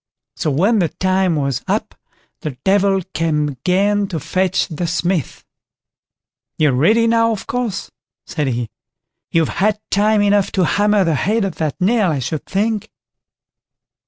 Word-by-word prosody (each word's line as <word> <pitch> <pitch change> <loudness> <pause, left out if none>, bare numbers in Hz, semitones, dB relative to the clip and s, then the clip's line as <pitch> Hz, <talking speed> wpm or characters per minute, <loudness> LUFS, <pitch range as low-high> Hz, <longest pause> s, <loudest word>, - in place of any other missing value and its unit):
So - - -1
when 195 - +2
the 170 -4 +1
time 185 -1 +1
was 140 -4 -1
up, - - -1 0.5
the 145 -5 -6
Devil 195 -1 +3
came 155 -2 0
again 195 +9 +1
to 175 -5 -4
fetch 185 +4 0
the 170 0 -3
Smith. 175 -2 -2 1.1
"You're 150 -4 +3
ready 215 - +3
now, 230 0 +3
of 215 - -4
course", 240 -6 -3 0.3
said 150 -3 -2
he; 120 -3 -2 0.6
"you've 165 -2 +1
had 210 +1 +2
time 210 +1 +3
enough 200 -1 +2
to 185 -2 +2
hammer 205 +2 +2
the 165 -2 +1
head 205 +8 +1
of 190 - -5
that 155 +1 -2
nail, 205 +1 +2
I 155 - 0
should 135 +4 -4
think." 210 +1 -1
185 Hz, 150 wpm, -18 LUFS, 155-205 Hz, 1.1 s, Devil